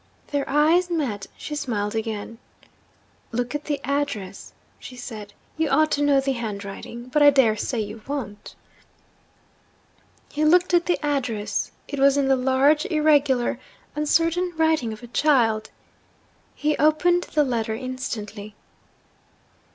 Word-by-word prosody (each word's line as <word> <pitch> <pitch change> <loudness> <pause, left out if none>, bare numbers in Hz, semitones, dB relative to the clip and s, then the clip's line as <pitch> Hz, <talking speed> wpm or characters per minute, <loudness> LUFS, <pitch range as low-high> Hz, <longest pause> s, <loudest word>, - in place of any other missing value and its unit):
Their 285 -1 -2
eyes 320 +6 +3
met; 250 - -2
she 300 - -7
smiled 210 -7 -2
again. 225 0 -4 0.9
'Look 245 +2 -2
at 295 0 -4
the 290 -2 -2
address,' 260 -9 -3 0.3
she 255 - -10
said. 220 -4 -8 0.3
'You 320 -1 +1
ought 310 +1 +3
to 290 - +1
know 285 -1 +4
the 270 0 0
handwriting 230 +1 -6
but 300 +3 +1
I 290 - +9
dare 265 -6 +4
say 225 +2 -2
you 210 +1 -7
don't.' 230 -8 -6 1.8
He 300 - -1
looked 355 +4 +4
at 345 0 +3
the 350 - +2
address. 230 -8 -1 0.2
It 285 - -5
was 275 +1 +5
in 280 -1 +2
the 270 - +5
large, 270 +6 +3
irregular, 290 -7 +2 0.4
uncertain 330 +4 +1
writing 320 -7 +2
of 220 +2 -9
a - - -8
child. 235 -5 +2 0.9
He 300 0 0
opened 345 +4 +3
the 300 - +1
letter 230 -4 -1
instantly. 220 -4 -6
270 Hz, 135 wpm, -24 LUFS, 225-300 Hz, 1.8 s, I